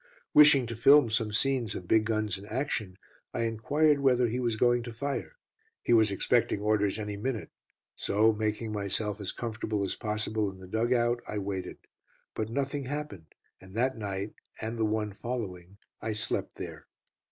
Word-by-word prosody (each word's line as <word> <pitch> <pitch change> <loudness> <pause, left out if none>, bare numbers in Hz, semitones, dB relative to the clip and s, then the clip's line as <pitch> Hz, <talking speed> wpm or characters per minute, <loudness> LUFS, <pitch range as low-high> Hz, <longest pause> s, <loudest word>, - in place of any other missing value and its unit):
Wishing 145 -4 +8
to 115 0 -5
film 125 +1 +6
some 110 -2 0
scenes 120 -1 +1
of 90 - -6
big 110 +2 +4
guns 110 -3 0
in 100 +1 -9
action, 110 -6 -2 0.4
I 120 - 0
enquired 140 +7 +2
whether 125 -3 +3
he 120 +3 -2
was 120 -3 0
going 120 +2 +3
to 120 0 -7
fire. 140 - -4 0.5
He - - +2
was 110 -2 +6
expecting 115 +2 +1
orders 105 -1 +1
any 105 -1 -4
minute, 115 +1 -3 0.4
so 110 +2 +3
making 110 +1 -2
myself 105 0 -2
as 100 - -2
comfortable 110 -3 -3
as 95 - -2
possible 105 -1 -1
in 95 - -11
the 95 - -11
dug 110 +6 -1
out, 120 -1 +2
I 105 - -4
waited. 95 -2 -4 0.6
But 110 0 -3
nothing 140 +2 -2
happened, 130 - -6 0.2
and 95 +1 -14
that 130 +3 +1
night, 100 -1 -4 0.3
and 110 +1 -3
the 110 -1 +1
one 105 -1 -1
following, 100 -6 -5 0.2
I 110 0 -2
slept 105 - -2
there. - - -8
110 Hz, 175 wpm, -29 LUFS, 105-120 Hz, 0.6 s, Wishing